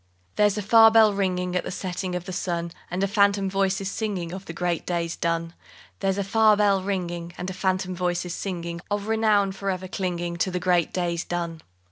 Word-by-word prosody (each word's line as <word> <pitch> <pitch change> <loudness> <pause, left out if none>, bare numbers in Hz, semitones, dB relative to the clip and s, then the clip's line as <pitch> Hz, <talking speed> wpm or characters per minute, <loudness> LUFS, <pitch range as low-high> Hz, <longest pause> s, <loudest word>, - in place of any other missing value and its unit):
_ - - -39
There's 210 0 +3
a 210 - -2
far 225 +2 +7
bell 220 -2 +6
ringing 180 -2 -1
At 180 - +1
the - - -5
setting 185 0 -4
of 180 -1 -4
the 185 - -6
sun, 170 -2 -2 0.2
And 180 +2 -2
a - - +3
phantom 200 -1 +2
voice 195 0 +1
is 195 0 -3
singing 190 -6 -3
Of 190 +1 -7
the - - -6
great 175 0 -1
days 170 -1 -2
done. 165 0 -1 0.5
There's 195 -1 0
a 200 - 0
far 215 +1 +4
bell 200 -2 +3
ringing, 175 -3 -3
And 185 +1 -4
a - - -6
phantom 185 -1 -1
voice 175 0 -1
is 175 - -4
singing 170 -3 -4
Of 205 0 -2
renown 215 -3 +3
for 195 +1 -4
ever 185 0 -3
clinging 175 -2 -3
To 180 - +1
the 180 0 -2
great 175 -2 +2
days 175 -1 -1
done. 170 -2 -4
185 Hz, 220 wpm, -25 LUFS, 175-200 Hz, 0.5 s, far